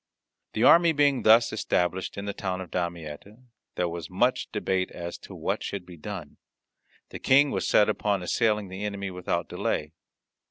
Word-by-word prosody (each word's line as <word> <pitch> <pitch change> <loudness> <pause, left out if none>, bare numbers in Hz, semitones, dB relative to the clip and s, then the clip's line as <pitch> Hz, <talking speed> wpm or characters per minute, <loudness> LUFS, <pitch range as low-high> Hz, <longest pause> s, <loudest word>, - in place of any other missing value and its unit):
The 110 - 0
army 170 +4 +7
being 145 -3 +3
thus 115 +2 +5
established 95 -4 -1
in 100 - -4
the 100 - -3
town 95 -1 -3
of 95 -2 -8
Damietta, 85 +2 -5 0.4
there 90 - 0
was 85 -1 -6
much 125 +7 0
debate 95 -3 -1
as 85 0 -6
to - - -11
what - - -2
should 100 -3 -5
be 90 - -11
done. 85 -2 -8 0.7
The - - -8
King 140 +2 +4
was - - -1
set 105 - +5
upon 105 -3 0
assailing 105 +1 +1
the 95 +2 -6
enemy 100 -2 -3
without 90 -2 -2
delay. 75 0 -2
100 Hz, 170 wpm, -27 LUFS, 90-110 Hz, 0.7 s, army